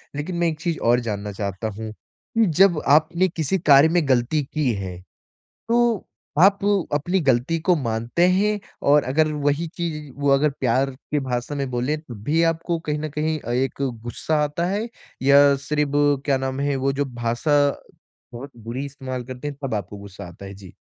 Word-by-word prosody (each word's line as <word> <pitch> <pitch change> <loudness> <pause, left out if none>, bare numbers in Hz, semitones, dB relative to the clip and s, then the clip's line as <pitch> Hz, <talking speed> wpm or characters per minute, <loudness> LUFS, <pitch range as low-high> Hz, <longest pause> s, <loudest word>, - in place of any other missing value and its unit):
लेकिन 150 +5 -4
मैं 170 0 +2
एक 155 -2 -3
चीज़ 170 -1 -2
और 120 +1 +5
जानना 105 -3 -4
चाहता 100 +1 -4
हूँ 110 0 -5
कि 225 - -3
जब 185 -6 +5
आपने 170 +5 +4
किसी 165 +2 -1
कार्य 140 +3 +8
में 165 -3 +1
ग़लती 130 +4 +2
की 150 -5 +1
है 95 -3 -5 0.7
तो 235 -3 +1 0.3
आप 195 +3 +6 0.3
अपनी 175 +6 +1
ग़लती 135 +2 +1
को 180 +2 +2
मानते 120 +5 0
हैं? 205 +3 +2 0.2
और 145 0 +4
अगर 155 +4 +1
वही 145 +3 0
चीज़ 155 -4 -4
वो 145 0 0
अगर 145 +2 +3
प्यार 130 +2 +1 0.2
के 150 - +2
भाषा 130 +1 -3
में 140 -2 -2
बोले 125 +5 -1
तब 125 -9 -11
भी 155 +7 +2
आपको 165 +1 -3
कहीं 150 -2 -3
न 155 +1 -4
कहीं 155 +2 -1
अ, 120 - -6
एक 130 +3 -1 0.2
गुस्सा 150 +6 -1
आता 150 +4 -1
है? 205 +5 -1 0.3
या 140 +1 +6
सिर्फ़ 145 -1 +1
क्या 140 -2 +2
नाम 130 0 -3
है 140 0 0
वो 135 - +3
जो 140 +1 -1
भाषा 120 +3 -2 0.8
बहुत 135 +4 -8
बुरी 120 +5 -4
इस्तेमाल 130 -3 -6
करते 130 +3 -7
हैं 145 -2 -6
तब 135 - -2
आपको 100 0 -5
गुस्सा 100 -2 -10
आता 85 +3 -11
है? 95 - -8
जी। 95 -3 -13
145 Hz, 185 wpm, -22 LUFS, 120-160 Hz, 0.8 s, कार्य